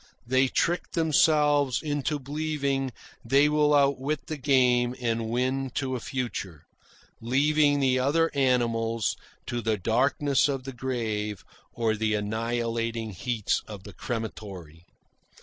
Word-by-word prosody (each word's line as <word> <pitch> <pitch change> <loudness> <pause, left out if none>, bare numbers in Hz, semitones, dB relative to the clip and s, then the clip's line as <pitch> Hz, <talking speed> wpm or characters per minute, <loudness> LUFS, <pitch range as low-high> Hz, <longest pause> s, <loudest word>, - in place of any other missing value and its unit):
They 130 +2 +3
trick 170 +6 -1
themselves 150 -4 +3
into 145 0 -1
believing 140 -2 -2 0.3
they 140 +5 +4
will 150 0 +3
outwit 140 +1 +1
the 155 - -4
game 125 -3 +3
and 115 -2 -1
win 130 +3 0
to 130 -2 -1
a - - -3
future, 110 - -5 0.6
leaving 145 +4 +3
the 130 -2 +2
other 160 +5 +2
animals 115 -4 +1 0.3
to 120 0 -3
the 110 -1 0
darkness 135 +8 +2
of 135 -2 -2
the 135 0 -7
grave 110 -5 -3 0.3
or 115 -2 0
the 110 0 0
annihilating 115 +1 -2
heats 110 +3 -1
of 105 -3 -9
the - - -11
crematory. 95 -8 -6
125 Hz, 125 wpm, -27 LUFS, 115-140 Hz, 0.6 s, they